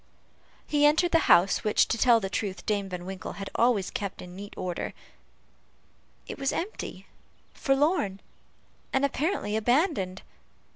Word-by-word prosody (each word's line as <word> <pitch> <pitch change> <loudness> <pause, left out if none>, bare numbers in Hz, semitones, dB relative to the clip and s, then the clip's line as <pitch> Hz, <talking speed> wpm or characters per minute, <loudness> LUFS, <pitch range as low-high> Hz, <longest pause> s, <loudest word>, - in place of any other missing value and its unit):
He 295 -1 +1
entered 330 +4 +3
the 330 - +5
house, 185 +3 +5
which, 210 - +3
to - - +1
tell 235 0 +5
the 195 - -3
truth, 190 -2 -4
Dame 200 -2 -1
Van 180 -1 -6
Winkle 190 0 -6
had 195 0 -7
always 230 -5 +2
kept 200 -2 -4
in 180 0 -11
neat 200 +2 -9
order. 180 -2 -4 1.3
It - - -8
was 275 0 0
empty, 395 +6 -5 0.5
forlorn, 270 - +1 0.7
and 265 +1 +2
apparently 280 - -1
abandoned. 220 - +1
210 Hz, 140 wpm, -27 LUFS, 190-280 Hz, 1.3 s, the